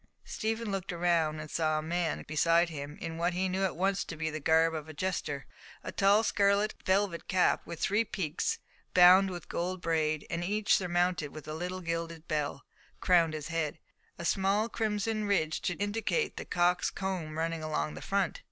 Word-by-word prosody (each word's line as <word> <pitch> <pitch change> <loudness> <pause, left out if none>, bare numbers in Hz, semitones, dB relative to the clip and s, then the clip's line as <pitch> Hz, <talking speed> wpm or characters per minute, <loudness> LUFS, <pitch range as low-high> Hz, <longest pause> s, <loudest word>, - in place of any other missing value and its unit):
Stephen 225 0 -2
looked 195 -1 -3
round 170 -3 +1
and 155 -1 -8
saw 155 -1 +1
a - - -1
man 170 0 -1
close - - -10
beside 165 +2 +3
him 145 -1 -7
in 165 0 -5
what 175 +2 0
he 190 +1 +1
knew 190 +1 -1
at 190 - 0
once 195 +3 +1
to 165 - -8
be 160 0 -2
the 155 - -4
garb 160 +2 +3
of 155 -1 -5
a 155 - -9
jester. 145 -6 -2 0.4
A - - -5
tall 205 +2 +4
scarlet 200 0 +2
velvet 190 -2 +1
cap, 185 -1 +3
with 170 -2 -6
three 210 +3 +2
peaks, 175 -7 -2 0.4
bound 185 +2 +8
with 175 -3 -7
gold 180 +2 -2
braid, 155 -3 0
and 170 +1 -3
each 205 +3 +2
surmounted 175 -4 0
with 155 - -9
a 155 - -4
little 180 +3 -4
gilded 165 -1 -4
bell, 150 -2 -2 0.4
crowned 170 -3 +3
his 155 +1 -6
head, 165 -2 -1 0.4
a 170 - -6
small 200 +5 +2
crimson 215 -1 -1
ridge 155 -6 +1
to 175 - -1
indicate 225 - -1
the - - -6
cock's 175 0 +2
comb 180 -5 -4
running 165 0 -1
along 75 - -2
the 75 - -8
front. - - 0
175 Hz, 190 wpm, -30 LUFS, 155-190 Hz, 0.4 s, bound